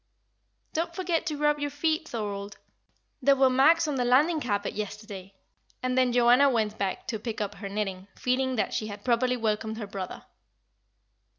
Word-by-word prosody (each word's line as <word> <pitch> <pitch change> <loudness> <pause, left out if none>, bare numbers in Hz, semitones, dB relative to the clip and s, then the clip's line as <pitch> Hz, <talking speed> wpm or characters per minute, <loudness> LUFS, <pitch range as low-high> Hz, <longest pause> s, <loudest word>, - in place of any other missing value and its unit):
"Don't 335 +1 -2
forget 345 -2 -1
to 305 -3 -2
rub 295 0 +2
your 290 0 -1
feet, 315 +2 -1
Thorold. 205 -3 -5 0.6
There 275 +1 +5
were 265 -1 +4
marks 310 +6 +5
on 290 -2 -1
the 250 - +1
landing 295 +7 +3
carpet 205 -5 -1
yesterday;" 205 -2 -7 0.5
and 255 0 0
then 255 -1 +3
Joanna 245 +3 +5
went 220 -4 0
back 195 -1 -2
to 220 - -2
pick 225 0 -5
up 205 -1 -2
her 200 0 -7
knitting, 195 -2 -3
feeling 260 +1 0
that 220 - -1
she 215 - -2
had 205 -1 -9
properly 250 +1 +2
welcomed 220 -1 -1
her 220 - -4
brother. 195 -2 -7
245 Hz, 175 wpm, -27 LUFS, 210-280 Hz, 0.6 s, There